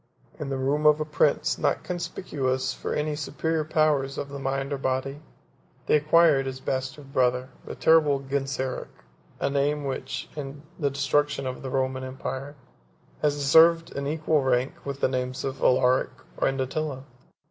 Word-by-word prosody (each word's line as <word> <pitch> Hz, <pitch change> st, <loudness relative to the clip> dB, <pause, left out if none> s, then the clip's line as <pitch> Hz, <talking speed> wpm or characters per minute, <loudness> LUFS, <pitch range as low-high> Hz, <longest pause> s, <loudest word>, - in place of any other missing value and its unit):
In 150 Hz, -, -4 dB
the 135 Hz, -, -2 dB
room 145 Hz, +3 st, +1 dB
of 150 Hz, 0 st, +5 dB
a 155 Hz, -, -1 dB
prince 150 Hz, -, +1 dB
not -, -, +1 dB
conspicuous 135 Hz, -7 st, -2 dB
for -, -, -4 dB
any 150 Hz, 0 st, -1 dB
superior 155 Hz, +2 st, -1 dB
powers 150 Hz, -3 st, +1 dB
of 140 Hz, -, -4 dB
the 140 Hz, 0 st, -6 dB
mind 135 Hz, +1 st, -2 dB
or 140 Hz, -, -3 dB
body, 135 Hz, +2 st, -2 dB, 0.6 s
they -, -, +3 dB
acquired 150 Hz, -2 st, +4 dB
his 130 Hz, 0 st, -5 dB
bastard 135 Hz, +2 st, -4 dB
brother, 125 Hz, 0 st, +2 dB, 0.2 s
the -, -, -6 dB
terrible 155 Hz, -4 st, +4 dB
Genseric; 135 Hz, -1 st, -3 dB, 0.5 s
13 -, -, -25 dB
a -, -, +1 dB
name, 145 Hz, +1 st, +1 dB
which, 135 Hz, -1 st, -4 dB
in 140 Hz, -1 st, -7 dB, 0.2 s
the 145 Hz, -3 st, +1 dB
destruction 140 Hz, +1 st, 0 dB
of 130 Hz, 0 st, -4 dB
the 135 Hz, -, -5 dB
Roman 130 Hz, 0 st, -1 dB
empire, 130 Hz, +2 st, -5 dB, 0.7 s
has 145 Hz, -1 st, +2 dB
deserved 165 Hz, +4 st, +5 dB
an 140 Hz, 0 st, -2 dB
equal 155 Hz, 0 st, +1 dB
rank 130 Hz, 0 st, +1 dB
with 140 Hz, 0 st, -5 dB
the -, -, +4 dB
names 130 Hz, 0 st, -3 dB
of 135 Hz, -1 st, -4 dB
Alaric 125 Hz, 0 st, +3 dB, 0.3 s
and 135 Hz, 0 st, +1 dB
Attila. 135 Hz, 0 st, -2 dB
140 Hz, 165 wpm, -26 LUFS, 130-150 Hz, 0.7 s, of